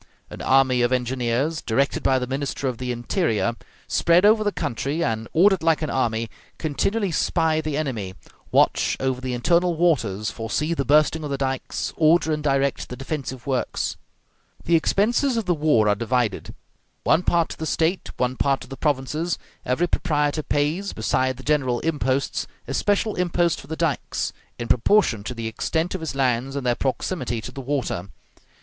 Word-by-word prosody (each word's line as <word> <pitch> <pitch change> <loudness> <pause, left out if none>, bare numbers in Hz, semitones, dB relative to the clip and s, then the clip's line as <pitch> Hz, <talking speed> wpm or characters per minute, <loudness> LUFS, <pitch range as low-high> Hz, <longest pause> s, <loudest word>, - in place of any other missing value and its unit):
An - - -8
army 130 -2 +3
of 120 +1 +2
engineers, 125 +4 0
directed 135 +5 0
by 130 - +3
the 125 - -1
Minister 135 +1 -3
of 125 -3 -3
the 125 -1 -2
Interior, 120 - 0 0.3
spread 170 +3 +4
over 215 +1 +5
the 205 - +1
country, 145 - -2
and, 110 -1 -2
ordered 190 +2 +4
like 160 -1 +2
an 155 - -2
army, 115 -3 0 0.3
continually 195 +6 -1
spy 160 0 +1
the 155 -2 -3
enemy, 115 -11 -3 0.4
watch - - +3
over 130 -1 -1
the 130 -1 -2
internal 170 +7 +2
waters, 115 - +1
foresee 120 +9 -2
the 140 -4 -1
bursting 155 +3 +3
of 150 - -4
the 140 - -1
dikes, 135 -1 -3
order 160 0 +4
and 150 - -2
direct 140 -1 0
the 125 - -5
defensive 135 -2 -5
works. 130 -2 -1 0.7
The 170 - +3
expenses 235 - +2
of 225 - -1
the 180 - +2
war 150 -9 +3
are 105 - +4
divided, 115 0 -1 0.5
one 165 - +4
part 170 -2 +2
to - - -7
the 160 - -3
State, 165 +5 0
one 125 +1 0
part 135 -1 +1
to - - -10
the 135 +1 -8
provinces; 150 +3 -1 0.3
every 130 +8 +2
proprietor 150 -3 0
pays, 150 +7 -1
beside 130 +3 0
the 130 - -11
general 130 -5 +1
imposts, 140 -4 -1 0.2
a - - -3
special 205 +7 +1
impost 175 -1 +1
for - - -15
the 160 - -4
dikes, 165 -3 -1 0.2
in 120 - -5
proportion 120 - +3
to 125 - -4
the 115 -1 -4
extent 160 +9 -1
of 190 - -4
his 160 -4 -4
lands 130 0 0
and 140 -2 -3
their 120 - +3
proximity 130 -1 -2
to - - -7
the 135 - -7
water. 130 -9 -2
140 Hz, 180 wpm, -23 LUFS, 125-165 Hz, 0.7 s, over